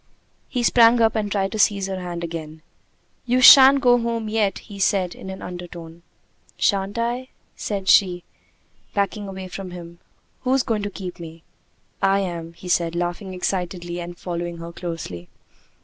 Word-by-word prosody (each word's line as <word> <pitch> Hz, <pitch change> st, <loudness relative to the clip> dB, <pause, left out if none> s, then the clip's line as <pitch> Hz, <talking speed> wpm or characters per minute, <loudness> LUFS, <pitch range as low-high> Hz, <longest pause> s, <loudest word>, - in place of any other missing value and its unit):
He 250 Hz, -2 st, -2 dB
sprang 235 Hz, 0 st, +5 dB
up 225 Hz, -1 st, +3 dB
and 210 Hz, -2 st, -1 dB
tried 195 Hz, -1 st, 0 dB
to 215 Hz, -, -4 dB
seize 200 Hz, -1 st, +3 dB
her 190 Hz, -1 st, -4 dB
hand 175 Hz, -1 st, -5 dB
again. 160 Hz, -2 st, -7 dB, 0.6 s
"You 250 Hz, +1 st, +2 dB
shan't 270 Hz, +1 st, +9 dB
go 245 Hz, -1 st, +5 dB
home 230 Hz, -2 st, -2 dB
yet!" 215 Hz, -2 st, 0 dB
he 200 Hz, -1 st, -11 dB
said, 190 Hz, -2 st, +1 dB
in 190 Hz, -, -10 dB
an 190 Hz, -, -7 dB
undertone. 170 Hz, -2 st, -9 dB, 0.6 s
"Shan't 200 Hz, +1 st, 0 dB
I?" 240 Hz, +2 st, -2 dB, 0.3 s
she 200 Hz, -2 st, -4 dB
said, 180 Hz, -2 st, +4 dB, 0.7 s
backing 200 Hz, 0 st, -1 dB
away 190 Hz, -1 st, -7 dB
from 185 Hz, +1 st, -7 dB
him. 170 Hz, -1 st, -10 dB, 0.4 s
"Who's 260 Hz, 0 st, +1 dB
going 220 Hz, -2 st, -1 dB
to 205 Hz, -, -3 dB
keep 185 Hz, -3 st, -8 dB
me?" 165 Hz, -1 st, -10 dB, 0.6 s
"I 195 Hz, 0 st, +3 dB
am," 170 Hz, -3 st, -5 dB
he 180 Hz, -, -12 dB
said, 170 Hz, -1 st, +1 dB
laughing 175 Hz, +2 st, -3 dB
excitedly 180 Hz, -1 st, -3 dB
and 175 Hz, 0 st, -7 dB
following 175 Hz, -1 st, -5 dB
her 170 Hz, 0 st, -8 dB
closely. 160 Hz, -, -6 dB
190 Hz, 165 wpm, -22 LUFS, 175-210 Hz, 0.7 s, shan't